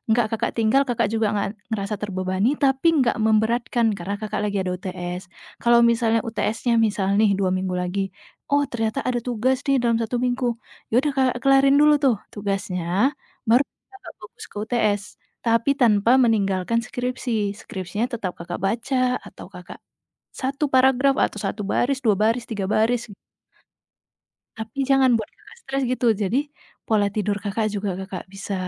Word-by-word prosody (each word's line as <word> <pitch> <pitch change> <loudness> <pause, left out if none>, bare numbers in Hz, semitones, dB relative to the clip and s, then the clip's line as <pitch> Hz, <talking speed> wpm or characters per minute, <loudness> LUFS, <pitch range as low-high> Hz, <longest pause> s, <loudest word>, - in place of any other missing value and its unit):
gak 235 -2 +2
Kakak 225 - -1
tinggal 225 +4 +3
Kakak 240 -3 +1
juga 225 -1 +1
nga 205 - 0 0.3
ngerasa 205 -1 -2
terbebani 190 +2 0
tapi 270 +2 +2 0.2
gak 240 - 0
memberatkan 225 +2 +2
karena 195 +3 -4
Kakak 215 -2 -3
lagi 200 0 -2
ada 185 - -2
UTS. 180 0 -5 0.4
Kalau 235 0 +5
misalnya 230 -1 +2
UTS-nya 225 +2 -1
misal 200 -2 -2
nih 215 -2 +4
2 190 -2 +1
minggu 185 0 -1
lagi, 180 +2 -2 0.5
"Oh 285 0 +4
ternyata 225 +2 -1
ada 250 -1 0
tugas 250 +2 +1
nih 275 - +4
dalam 235 -1 +2
1 230 +2 -2
minggu." 250 +1 -1 0.4
Ya - - -10
udah 295 - +1
Kakak 255 -2 +2
kelarin 275 0 +5
dulu 300 0 +6
tuh 260 -4 +4 0.2
tugasnya, 195 -3 -3 0.7
baru 245 +4 +5 0.3
Kakak 390 +1 -12
fokus 440 -2 -11
ke - - -20
UTS, 215 -3 0 0.4
tapi 230 +3 +2
tanpa 230 -4 +3
meninggalkan 205 -1 +1
skripsi. 245 -4 -2
Skripsinya 190 +5 -4
tetap 200 -6 -3
Kakak 175 +1 -6
baca 250 +5 0
atau - - -12
Kakak - - -11 0.6
1 275 +3 -1
paragraf 265 +1 +4
atau 210 - -7
1 200 +2 -3
baris, 265 +2 +1
2 215 -3 +4
baris, 230 +3 +2
3 205 -4 -3
baris. 230 +1 +1 1.5
Tapi 220 +3 -8
jangan 270 -1 +5
buat 220 - -6
Kakak - - -17
stres, 270 - -2
gitu. 255 -1 -1 0.2
Jadi, 205 +6 +1 0.5
pola 210 -2 +2
tidur 210 -1 0
Kakak 215 +2 -1
juga 205 0 -2
Kakak 190 -1 -6
bisa 195 +1 -6
225 Hz, 160 wpm, -23 LUFS, 200-250 Hz, 1.5 s, dulu